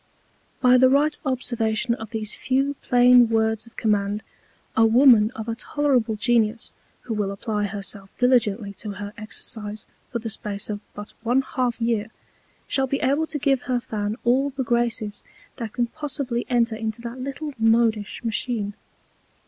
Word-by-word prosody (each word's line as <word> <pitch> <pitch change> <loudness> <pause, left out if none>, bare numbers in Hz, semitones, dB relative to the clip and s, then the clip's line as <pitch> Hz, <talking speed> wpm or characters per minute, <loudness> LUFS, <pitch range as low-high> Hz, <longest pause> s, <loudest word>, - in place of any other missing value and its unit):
By 255 -1 +6
the 260 0 +6
right 295 +3 +3
Observation 240 -2 0
of 220 -2 -6
these 220 -1 -2
few 270 +2 0
plain 245 -1 +6
Words 220 0 +1
of 230 - -18
Command, 205 -1 0 0.5
a 225 - +5
Woman 225 -1 +6
of 220 0 -6
a 230 - -1
tolerable 250 -2 0
Genius, 225 0 +1 0.3
who 230 - -4
will 205 -2 -1
apply 205 +1 -2
herself 200 0 -5
diligently 230 -5 +2
to 210 -3 -5
her 205 +1 -7
Exercise 215 0 -5 0.3
for 240 - -1
the 225 -1 -5
Space 205 -1 -4
of 205 - -4 0.2
but 205 0 -8
one 245 +4 +2
half 250 -3 -2
Year, 230 -2 0 0.6
shall 270 -1 0
be 275 +1 -1
able 290 +3 +1
to 305 - -3
give 275 -2 +1
her 250 -1 +2
Fan 210 -2 -3
all 260 +4 +3
the 270 -1 -3
Graces 235 -3 -1 0.4
that 230 -4 -5
can 240 - +1
possibly 275 -3 -3
enter 235 -2 +2
into 220 0 -4
that 235 +2 -6
little 275 +3 -5
modish 225 -1 +2
Machine. 225 -2 -2
230 Hz, 160 wpm, -24 LUFS, 215-255 Hz, 0.6 s, By